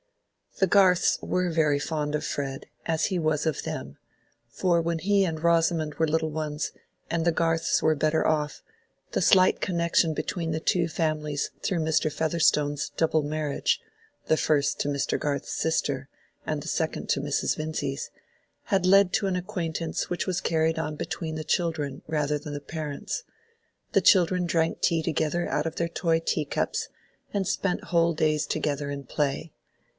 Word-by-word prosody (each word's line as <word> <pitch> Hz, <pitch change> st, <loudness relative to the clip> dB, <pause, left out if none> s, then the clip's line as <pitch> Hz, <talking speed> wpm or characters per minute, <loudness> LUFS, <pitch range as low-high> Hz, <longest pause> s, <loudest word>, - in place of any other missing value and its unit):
The 190 Hz, -, +5 dB
Garths 185 Hz, -2 st, +4 dB
were 180 Hz, 0 st, 0 dB
very 155 Hz, -3 st, +2 dB
fond 150 Hz, 0 st, -2 dB
of 150 Hz, -, -2 dB
Fred, 135 Hz, -1 st, -3 dB, 0.2 s
as 160 Hz, -1 st, +1 dB
he 185 Hz, -, -1 dB
was 155 Hz, -1 st, 0 dB
of 160 Hz, -3 st, -1 dB
them; 70 Hz, +1 st, -5 dB, 0.5 s
for 175 Hz, -3 st, +1 dB
when 165 Hz, 0 st, -1 dB
he 200 Hz, +3 st, +3 dB
and 160 Hz, -3 st, -3 dB
Rosamond 165 Hz, -2 st, +2 dB
were 160 Hz, +2 st, +1 dB
little 160 Hz, +1 st, +1 dB
ones, 150 Hz, -1 st, -3 dB, 0.4 s
and 170 Hz, -1 st, 0 dB
the 170 Hz, -, +3 dB
Garths 165 Hz, 0 st, +1 dB
were 155 Hz, 0 st, +3 dB
better 155 Hz, +2 st, +1 dB
off, 150 Hz, -1 st, 0 dB, 0.5 s
the -, -, 0 dB
slight 185 Hz, -2 st, +5 dB
connection 170 Hz, -2 st, +2 dB
between 165 Hz, +2 st, -3 dB
the 155 Hz, -, -1 dB
two 170 Hz, +1 st, +1 dB
families 155 Hz, -3 st, -1 dB
through 180 Hz, -, 0 dB
Mr. 160 Hz, -1 st, +1 dB
Featherstone's 150 Hz, -2 st, +1 dB
double 160 Hz, -1 st, +2 dB
marriage 150 Hz, -1 st, 0 dB, 0.5 s
(the 160 Hz, -, +3 dB
first 145 Hz, -2 st, +1 dB
to -, -, -1 dB
Mr. 140 Hz, -1 st, 0 dB
Garth's 145 Hz, -2 st, -2 dB
sister, 160 Hz, -, -1 dB, 0.4 s
and -, -, -2 dB
the -, -, -8 dB
second -, -, -2 dB
to -, -, +2 dB
Mrs. -, -, 0 dB
Vincy's) 155 Hz, -3 st, -3 dB, 0.6 s
had 195 Hz, -2 st, +1 dB
led 195 Hz, 0 st, +5 dB
to 200 Hz, -, +2 dB
an 190 Hz, -, 0 dB
acquaintance 175 Hz, -3 st, -3 dB
which 175 Hz, -, -2 dB
was 185 Hz, -2 st, -1 dB
carried 160 Hz, 0 st, +1 dB
on 155 Hz, -1 st, -3 dB
between 165 Hz, 0 st, -4 dB
the 155 Hz, -, -4 dB
children 155 Hz, -5 st, -1 dB
rather 150 Hz, -1 st, 0 dB
than 145 Hz, 0 st, -7 dB
the 145 Hz, -, -3 dB
parents: 155 Hz, -, -5 dB, 0.7 s
the -, -, +5 dB
children 180 Hz, -2 st, +4 dB
drank 165 Hz, -1 st, 0 dB
tea 165 Hz, -2 st, +2 dB
together 160 Hz, +2 st, 0 dB
out 150 Hz, -, -1 dB
of 165 Hz, -, -5 dB
their 170 Hz, 0 st, 0 dB
toy 165 Hz, -1 st, +1 dB
teacups, 155 Hz, -3 st, -1 dB, 0.4 s
and 195 Hz, -3 st, 0 dB
spent 195 Hz, -3 st, -1 dB
whole 170 Hz, -1 st, +2 dB
days 155 Hz, -1 st, +1 dB
together 145 Hz, -2 st, -2 dB
in 140 Hz, 0 st, -5 dB
play. 145 Hz, +3 st, -2 dB
160 Hz, 165 wpm, -27 LUFS, 150-170 Hz, 0.7 s, The